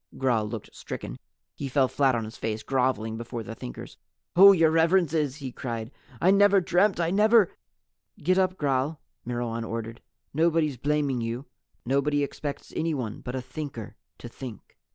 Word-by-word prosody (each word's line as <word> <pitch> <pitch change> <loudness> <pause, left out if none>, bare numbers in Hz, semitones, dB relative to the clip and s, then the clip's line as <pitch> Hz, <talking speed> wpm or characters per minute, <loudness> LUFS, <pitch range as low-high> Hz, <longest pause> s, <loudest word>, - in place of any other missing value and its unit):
Gral 115 -5 +1
looked 110 -2 -7
stricken. - - -7 0.3
He 140 - -5
fell 130 0 +3
flat 135 -1 +2
on 115 - -1
his 110 - -9
face, 110 -1 -3
groveling 125 -4 0
before 115 0 -5
the 115 - -7
Thinkers. - - -9 0.4
"Oh, 195 +3 +10
Your 165 -4 +4
Reverences," 160 -4 +2
he 135 -4 -6
cried, 115 -2 -5 0.3
"I 185 - +4
never 200 0 +6
dreamt 185 +2 +2
I 170 0 +1
never 215 0 +5 0.3
" - - -56
"Get 185 +4 +3
up, 185 0 +1
Gral," 140 +1 0 0.3
Myrwan 120 -1 -2
ordered. 115 0 -5 0.3
"Nobody's 160 -2 +2
blaming 140 -2 0
you. 115 +4 -4 0.4
Nobody 140 +3 +1
expects 140 0 -5
anyone 140 -10 -2
but 125 0 -5
a 130 - -3
Thinker 130 -4 -7 0.2
to - - -9
Think." 120 -2 -10
135 Hz, 160 wpm, -27 LUFS, 115-165 Hz, 0.4 s, Oh